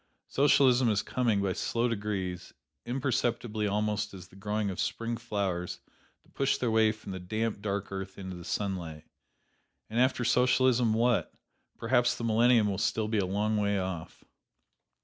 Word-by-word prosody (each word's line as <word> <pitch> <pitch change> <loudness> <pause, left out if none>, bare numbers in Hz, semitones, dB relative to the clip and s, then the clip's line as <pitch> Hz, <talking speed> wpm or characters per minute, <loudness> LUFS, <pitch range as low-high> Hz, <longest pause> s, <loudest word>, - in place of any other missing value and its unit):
Socialism 130 -3 +4
is 105 -1 +1
coming, 115 -6 0
by 95 -2 0
slow 115 +5 0
degrees, 100 -5 -3 0.3
imperceptibly 120 -4 -1
almost 105 0 -1
as 90 -2 -11
the - - -18
growing 105 +1 -2
of 90 - -7
Spring 115 0 -2
flowers 100 -7 -3 0.4
that - - -27
push 135 0 +1
their 120 -3 0
way 110 -1 +4
from 110 -2 -9
the 95 - -5
damp, 110 +3 -2
dark 100 -1 -3
earth 95 0 -6
into 95 -2 -6
the 90 - -9
sunlight. 85 -6 -3 0.9
And 115 - 0
after 130 -1 +2
Socialism, 125 -2 +3
what? 120 0 +2 0.5
Perhaps 120 0 +2
the - - -6
millennium 115 0 +4
will 100 -1 -2
still 110 0 0
be 110 -1 +1
a 95 - 0
long 105 +3 0
way 100 -1 +1
off. 95 -4 -5
105 Hz, 160 wpm, -29 LUFS, 100-120 Hz, 0.9 s, Socialism